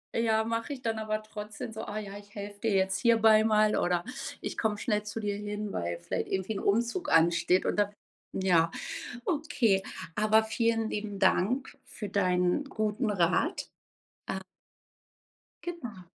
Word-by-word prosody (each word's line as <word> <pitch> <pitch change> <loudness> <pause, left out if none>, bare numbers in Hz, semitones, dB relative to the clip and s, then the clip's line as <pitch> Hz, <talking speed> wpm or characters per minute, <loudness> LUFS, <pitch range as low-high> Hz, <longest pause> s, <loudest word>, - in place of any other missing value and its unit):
Ja, 220 -1 +3
mache 230 +5 -2
ich 265 -2 -9
dann 225 -1 -1
aber 215 0 -2
trotzdem 215 0 -7
so: 220 - -5
„Ah, 210 - -5
ja, 200 -2 -5
ich 205 0 -18
helfe 205 0 -7
dir 225 - +1
jetzt 190 0 +2
hierbei 220 0 +6
mal 215 -1 +4
oder 175 -1 +1 0.4
ich - - -5
komme 215 -2 +1
schnell 210 -1 0
zu 210 +1 -5
dir 205 -2 -1
hin“, 210 0 -4
weil 85 0 -2
vielleicht 85 - -3
irgendwie 190 +3 -1
'n 195 - -3
Umzug 235 - 0
ansteht 170 +2 +4
und - - 0
dann 205 -1 +3 0.4
ja. 175 -3 +3 0.6
Okay, 285 - +2 0.3
aber 215 0 +4
vielen 225 0 +1
lieben 205 -1 -4
Dank 205 +7 +2
für 210 -3 -7
deinen 180 +5 +2
guten 215 -1 -1
Rat, 190 - +1 0.6
äh. - - -2 1.3
Genau. 240 - -6
210 Hz, 155 wpm, -30 LUFS, 195-225 Hz, 1.3 s, hierbei